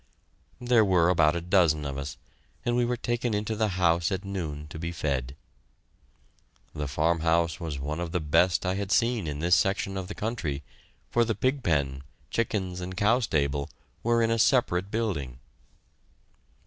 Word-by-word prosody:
There 120 -2 +4
were 90 -4 +3
about 85 -2 +4
a 85 - -2
dozen 85 -5 +3
of 70 -1 -4
us, 70 +1 -5 0.5
and 120 - +1
we 120 0 +2
were 120 0 -1
taken 120 -1 -1
into 105 +1 -2
the 110 0 +1
house 85 -2 +2
at 95 +1 -3
noon 80 -7 -4
to 80 - -8
be 85 +1 -3
fed. 70 -5 -2 1.4
The 75 -1 -3
farmhouse 80 +2 +1
was 80 -4 -4
one 75 +4 -4
of 85 -1 -3
the 90 - 0
best 85 +4 +2
I 90 - +1
had 100 0 -3
seen 115 -6 +2
in 75 -1 -3
this 85 +4 +1
section 95 -1 0
of 95 -1 -4
the 105 - -7
country, 90 -11 -3 0.5
for 120 - +3
the 110 -1 -1
pig 130 +2 0
pen, 70 - 0 0.3
chickens, 95 -6 -1
and 90 +1 -6
cow 110 +4 +3
stable 70 - 0 0.3
were 115 0 +2
in 115 - +2
a 115 - +1
separate 100 -7 +2
building. 90 - -2
90 Hz, 175 wpm, -27 LUFS, 75-110 Hz, 1.4 s, There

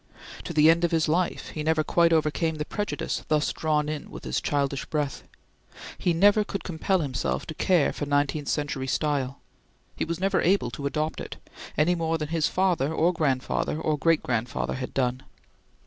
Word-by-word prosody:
To - - -4
the 155 0 +5
end 170 +1 +1
of 170 - +3
his 160 -1 +1
life 170 +3 0
he 155 - -5
never 155 0 +2
quite 170 +2 +3
overcame 160 0 +1
the 150 0 -3
prejudice 205 +5 -3
thus 150 -1 +1
drawn 150 -2 0
in 150 -1 -5
with - - -9
his - - -1
childish 140 -1 -1
breath. 145 -3 -2 0.8
He 180 - +1
never 205 +5 +5
could 195 -1 -5
compel 180 +2 0
himself 135 -4 -2
to 160 - -6
care 175 -1 +2
for 145 - -4
nineteenth 145 0 0
century 145 -3 -2
style. 140 -2 -1 0.6
He - - -2
was 170 +1 -3
never 195 0 +1
able 190 -7 +2
to 140 +4 -3
adopt 155 +2 -2
it, - - -7 0.4
any 155 +5 +4
more 165 -1 0
than 150 -2 -4
his 165 -2 +1
father 180 -7 +1
or 165 +2 +2
grandfather 150 -1 0
or 155 -1 0
great 165 +2 +2
grandfather 120 -1 -1
had 130 -1 -5
done. 130 -1 0
155 Hz, 185 wpm, -26 LUFS, 145-170 Hz, 0.8 s, the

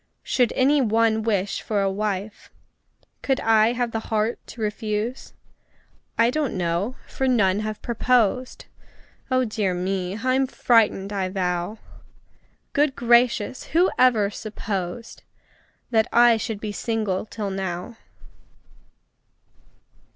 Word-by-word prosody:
Should 245 -3 +1
any 280 +2 +3
one 225 -1 +2
wish 205 -3 -1
for 210 -2 -1
a 195 - +1
wife, 205 0 -4 0.7
Could 270 -1 0
I 225 +1 +4
have 245 -1 -1
the 225 - -2
heart 220 +2 0
to - - -11
refuse? 215 +2 -3 0.8
I 230 +1 +4
don't 285 -7 -1
know 180 +7 -1
for 265 - -2
none 205 -6 +3
have 215 0 -5
proposed 245 0 +1 0.6
Oh, 255 0 +2
dear 210 -4 -1
me! 185 +1 -2
I'm 255 +3 +1
frightened, 215 -6 +2
I 190 -2 -1
vow! 180 +1 -2 1.0
Good 285 -1 +2
gracious! 240 0 +2
who 350 +4 +2
ever 225 -5 +4
supposed 205 0 -5 0.7
That 220 -1 +3
I 240 0 +6
should 220 -1 -4
be 215 0 -4
single 215 -3 -2
till 205 -3 -4
now? 190 +3 -4
220 Hz, 120 wpm, -23 LUFS, 200-240 Hz, 1.0 s, I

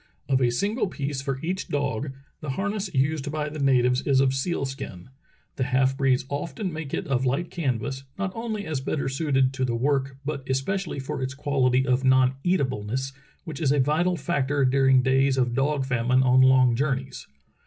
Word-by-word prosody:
Of 135 -1 +2
a 125 - +3
single 205 - 0
piece 140 -5 -4
for 135 -1 -3
each 185 +3 -2
dog, 140 -2 -2 0.3
the 150 - -6
harness 200 +6 -2
used 145 +1 0
by 150 -1 -2
the 155 +1 -7
natives 125 -2 +3
is 135 -2 +2
of 135 -1 +3
seal 140 +2 -1
skin; 130 -8 -7 0.5
the 130 - 0
half 130 +1 +2
breeds 135 -1 +1
often 145 +6 -4
make 155 -3 -6
it - - -2
of 130 -2 0
light 135 +7 -1
canvas, 130 -3 -2
not 195 -1 -2
only 220 -3 -4
as 150 -4 -3
better 140 +1 -2
suited 135 -2 +1
to 130 - -2
the 120 -2 0
work 135 +1 0
but 145 -1 -3
especially 165 +8 -1
for 135 0 -4
its 130 +1 -3
quality 130 -2 +1
of 130 0 +1
non 130 0 +4
eatableness 130 - -1 0.3
which 160 -4 -7
is 140 -4 +2
a 145 - +2
vital 165 +6 +1
factor 140 -2 0
during 135 0 +4
days 135 0 +2
of 125 -2 +1
dog 135 +1 0
famine 125 0 +2
on 130 0 +5
long 130 -2 +5
jour 135 +2 +1
neys. 130 -1 -8
135 Hz, 190 wpm, -25 LUFS, 130-150 Hz, 0.5 s, on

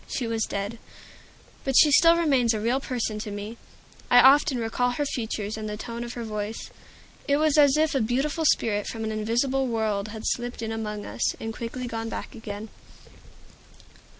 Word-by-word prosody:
She 250 - -3
was 225 -1 -1
dead. 200 +3 -4 0.8
But 270 -1 -1
she 300 - +7
still 335 +3 +6
remains 265 -9 +2
a - - -2
real 235 +5 +1
person 235 -5 -3
to 210 - -5
me; 205 +3 -6 0.5
I 245 - +7
often 270 +1 +6
recall 235 +2 0
her 290 +4 -1
features 220 -5 -3
and 215 -1 -5
the 210 - -5
tone 235 +2 -6
of 240 0 -6
her 240 - -5
voice. 215 0 -5 0.6
It 280 - +3
was 310 -1 +2
as 290 -2 +5
if 315 0 +2
a 270 - +1
beautiful 270 +8 0
spirit 210 -7 +2
from 225 -1 -5
an 220 - -2
invisible 240 +5 0
world 220 -3 -1
had 215 0 -8
slipped 240 -1 -2
in 225 - -3
among 210 -2 -4
us, - - -1
and 225 0 -6
quickly 245 +2 -5
gone 225 -1 -4
back - - -6
again. 215 -1 -7
230 Hz, 185 wpm, -26 LUFS, 215-265 Hz, 0.8 s, she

